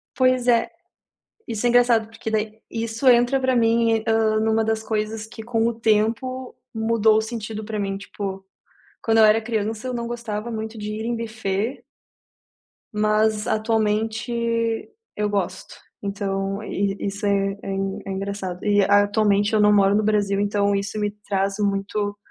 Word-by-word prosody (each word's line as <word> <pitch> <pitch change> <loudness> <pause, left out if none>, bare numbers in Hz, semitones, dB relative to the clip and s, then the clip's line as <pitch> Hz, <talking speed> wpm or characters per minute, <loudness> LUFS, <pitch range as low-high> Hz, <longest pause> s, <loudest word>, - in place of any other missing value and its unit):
Pois 255 -1 +2
é. 235 +5 +3 0.8
Isso 225 0 -3
é - - +4
engraçado 240 -2 +4
porque 225 0 -6
daí, 220 0 -2
isso 230 +3 -2
entra 245 +2 +4
pra 260 -1 +1
mim, 230 -1 +3
hã, 220 -1 +2
numa 220 0 +2
das 220 0 -1
coisas 215 0 -2
que 220 0 -10
com 225 0 0
o 235 - 0
tempo 230 +4 0 0.2
mudou 220 -1 +3
o - - +3
sentido 220 -1 -5
pra 215 -1 -4
mim. 195 -1 -2
Tipo, 195 -1 -6 0.6
quando 225 -1 +2
eu 220 - +8
era 215 +1 +4
criança 220 +1 -2
eu 255 - -3
não 235 -1 -3
gostava 235 -2 -4
muito 220 0 -5
de 210 0 -5
ir 220 +1 -4
em 240 0 -1
buffet 225 +2 -3 1.1
mas 215 0 +1
atualmente 220 +1 0 0.8
eu 210 0 0
gosto. 190 -3 -3 0.3
Então 195 0 -2
e 195 -1 -1
isso 200 +1 -4
é 195 -1 +1
é - - -5 0.4
é - - -4
engraçado. 190 -2 -4
E, 205 -1 +4
atualmente, 205 +1 +3
eu 215 - +3
não 210 0 +5
moro 200 -1 +4
no 215 - +3
Brasil, 205 -2 +1
então 205 0 +1
isso 200 +2 -2
me 210 -1 0 0.2
traz 195 0 0
muito 205 0 -1
215 Hz, 160 wpm, -23 LUFS, 205-225 Hz, 1.1 s, eu